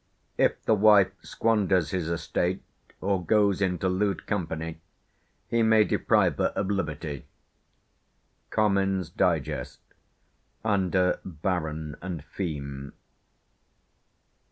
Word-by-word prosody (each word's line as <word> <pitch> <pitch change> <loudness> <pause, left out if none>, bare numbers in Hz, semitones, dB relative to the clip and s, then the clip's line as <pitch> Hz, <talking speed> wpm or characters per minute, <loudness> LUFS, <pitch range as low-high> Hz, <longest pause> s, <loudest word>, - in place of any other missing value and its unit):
"If - - +1
the - - +4
wife 105 -2 +6
squanders 100 -6 +1
his 90 -3 -2
estate, 90 +2 -1 0.4
or 95 -2 0
goes 100 +1 +2
into 95 -1 0
lewd 95 +2 0
company, 80 -4 -3 0.7
he 115 - +1
may 110 -1 +5
deprive - - +2
her - - +2
of 100 0 -1
liberty" 75 -7 -3 1.2
(Comyn's 95 -4 +1
Digest, - - -1 0.9
under 95 -3 +2
"Baron 80 -3 -3
and 85 -5 -5
Feme"). 70 -6 -5
95 Hz, 95 wpm, -27 LUFS, 80-100 Hz, 1.2 s, wife